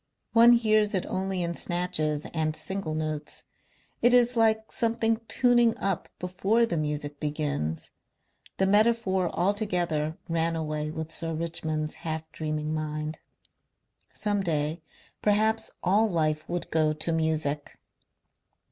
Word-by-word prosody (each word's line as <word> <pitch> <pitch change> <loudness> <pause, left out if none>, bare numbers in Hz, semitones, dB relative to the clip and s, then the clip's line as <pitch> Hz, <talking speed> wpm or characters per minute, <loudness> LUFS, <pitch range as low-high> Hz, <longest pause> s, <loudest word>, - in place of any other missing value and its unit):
One 235 +1 +8
hears 215 -2 +3
it 185 - 0
only 190 -1 -2
in 170 0 -2
snatches 155 -4 -1
and 155 -1 0
single 160 0 -3
notes. 155 -1 -3 0.6
It 245 +1 +6
is 245 0 +4
like 220 -1 +2
something 225 -1 +1
tuning 240 -2 +3
up 195 -3 -2
before 190 +6 +1
the 200 - -2
Music 150 -2 -3
begins.... 145 - -2 0.7
The 190 - +3
metaphor 205 -3 +3
altogether 175 -5 0
ran 165 0 0
away 155 -1 -2
with 160 +1 -5
Sir 165 0 -3
Richmond's 155 -1 -2
half 160 -1 -4
dreaming 155 0 -3
mind. 155 0 -3 0.9
Some 205 -1 0
day 155 -2 -1 0.4
perhaps 220 +1 +2
all 210 +5 +3
life 155 -3 0
would 175 0 -3
go 155 -1 +3
to 155 +2 0
music. 155 -3 -1
170 Hz, 125 wpm, -27 LUFS, 155-210 Hz, 0.9 s, One